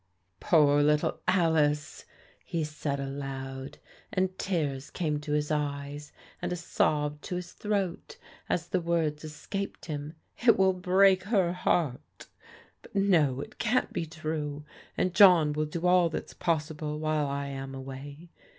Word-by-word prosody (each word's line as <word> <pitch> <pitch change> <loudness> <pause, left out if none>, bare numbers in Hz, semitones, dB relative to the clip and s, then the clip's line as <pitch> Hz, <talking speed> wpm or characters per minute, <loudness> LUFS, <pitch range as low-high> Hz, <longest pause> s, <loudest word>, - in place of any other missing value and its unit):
" 90 -1 -46
Poor 145 -3 +4
little 150 0 +2
Alice! 155 -5 +2 0.2
" - - -30
he 165 -2 -2
said 150 -2 -3
aloud, 135 0 -5 0.3
and 185 -2 0
tears 150 -7 -2
came 150 -4 -1
to 150 0 -4
his 150 0 0
eyes, 145 0 -3 0.3
and - - -2
a - - 0
sob 150 -3 0
to 180 - -5
his 180 -1 -5
throat 200 -4 -3 0.3
as 175 0 -1
the 185 0 0
words 165 -3 0
escaped 175 +6 -5
him. 150 0 -5
" - - -32
It 230 - +7
will 190 0 +4
break 185 +1 +4
her 195 -5 +2
heart 165 -7 -1 0.6
But - - -17
no, 160 -10 +3
it - - -10
can't 240 +2 +1
be 165 - -2
true, 155 -2 -4 0.3
and 185 - +1
John 180 -6 +7
will 155 +1 0
do 170 +3 -4
all 180 -1 +5
that's - - -5
possible 155 -2 -2
while 155 -1 0
I 140 0 -2
am 135 0 -6
away. 140 +5 -9
155 Hz, 155 wpm, -29 LUFS, 145-180 Hz, 0.6 s, It